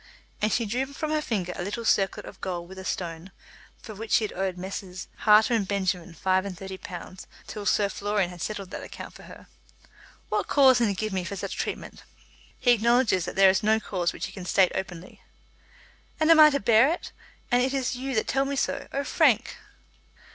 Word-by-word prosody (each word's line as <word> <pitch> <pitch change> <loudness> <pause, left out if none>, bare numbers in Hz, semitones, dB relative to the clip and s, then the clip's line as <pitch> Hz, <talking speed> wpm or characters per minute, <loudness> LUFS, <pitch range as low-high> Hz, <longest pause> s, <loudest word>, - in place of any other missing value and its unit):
And 215 +1 +1
she 235 - +1
drew 245 +6 -1
from 305 +3 -4
her 310 0 +1
finger 190 -10 -2
a - - -5
little 205 +5 -4
circlet 195 -2 +1
of - - -12
gold 175 -2 -4
with 190 +1 -10
a - - -7
stone, 170 0 -4 0.5
for 220 - -10
which 220 +2 -5
she - - +4
had 215 - -3
owed 190 -1 -2
Messrs. 185 0 -6 0.2
Harter 215 +3 +6
and 215 -4 +1
Benjamin 185 -3 -2
five 185 +2 +1
and 195 -3 -6
thirty 190 0 -8
pounds 185 +1 -9 0.2
till 205 -1 -6
Sir 205 -1 +3
Florian 200 -2 -1
had 175 -1 -10
settled 200 -3 -5
that - - -6
account - - -9
for - - -14
her. - - -13 0.8
"What - - -1
cause 265 -3 +5
can 235 - +3
he 200 - -1
give 215 +1 -3
for 200 - -5
such - - -5
treatment?" - - -5 0.6
"He 245 - +3
acknowledges 235 -5 +3
that - - -6
there 195 -1 +7
is 190 - 0
no 220 +1 +3
cause 180 -5 -2
which - - -5
he - - -8
can 185 -3 -8
state 185 0 +3
openly." 185 -2 -6 1.0
"And 315 +1 +4
I 315 -2 +9
am - - +3
to 280 - 0
bear 225 +4 +5
it? 345 - -5 0.4
And 245 0 +4
it 260 +1 +1
is 265 -2 -1
you 265 +1 -4
that 220 - 0
tell 270 0 +1
me 280 +1 -2
so? 275 - -2
Oh, 280 - -2
Frank!" 275 - +2
205 Hz, 210 wpm, -26 LUFS, 190-245 Hz, 1.0 s, I